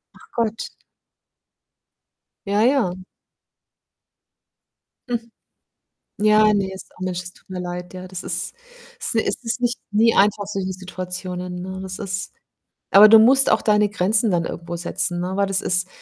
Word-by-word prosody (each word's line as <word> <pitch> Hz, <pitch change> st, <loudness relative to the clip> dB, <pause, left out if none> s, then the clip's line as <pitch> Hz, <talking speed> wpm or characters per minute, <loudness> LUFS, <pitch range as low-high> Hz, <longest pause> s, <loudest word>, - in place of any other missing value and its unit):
Ach -, -, -19 dB
Gott. 225 Hz, -1 st, -2 dB, 1.8 s
Ja, 205 Hz, +2 st, +2 dB
ja. 240 Hz, -9 st, +2 dB, 2.1 s
Hm. 235 Hz, -1 st, -3 dB, 0.9 s
Ja, 215 Hz, 0 st, +5 dB
ne, 195 Hz, -2 st, 0 dB
ist 190 Hz, -, -11 dB
auch -, -, -19 dB
Mensch, 180 Hz, -1 st, -2 dB
das 180 Hz, 0 st, -10 dB
tut -, -, -24 dB
mir 185 Hz, -1 st, -5 dB
leid, 180 Hz, 0 st, -6 dB
ja. 185 Hz, 0 st, -8 dB
Das 185 Hz, -1 st, -7 dB
ist 175 Hz, +2 st, -3 dB, 0.5 s
s 460 Hz, -, -2 dB
es 220 Hz, +1 st, 0 dB
ist 235 Hz, +1 st, -3 dB
nicht 245 Hz, -1 st, 0 dB
nie 225 Hz, +2 st, +4 dB
einfach, 205 Hz, 0 st, +3 dB
solche 195 Hz, -2 st, -3 dB
Situationen, 180 Hz, -1 st, -6 dB
ne? 190 Hz, +1 st, -6 dB
Das 190 Hz, +1 st, -6 dB
ist 195 Hz, -1 st, -4 dB, 0.6 s
aber 210 Hz, +2 st, +9 dB
du 225 Hz, -, +9 dB
musst 265 Hz, +5 st, +5 dB
auch -, -, +3 dB
deine 210 Hz, -1 st, +3 dB
Grenzen 210 Hz, +2 st, +1 dB
dann 170 Hz, -2 st, +1 dB
irgendwo 170 Hz, 0 st, -6 dB
setzen, 175 Hz, +1 st, -2 dB
ne? 185 Hz, +2 st, -3 dB
Weil 200 Hz, 0 st, +1 dB
das 195 Hz, 0 st, 0 dB
ist 180 Hz, 0 st, 0 dB
195 Hz, 155 wpm, -22 LUFS, 180-215 Hz, 2.1 s, aber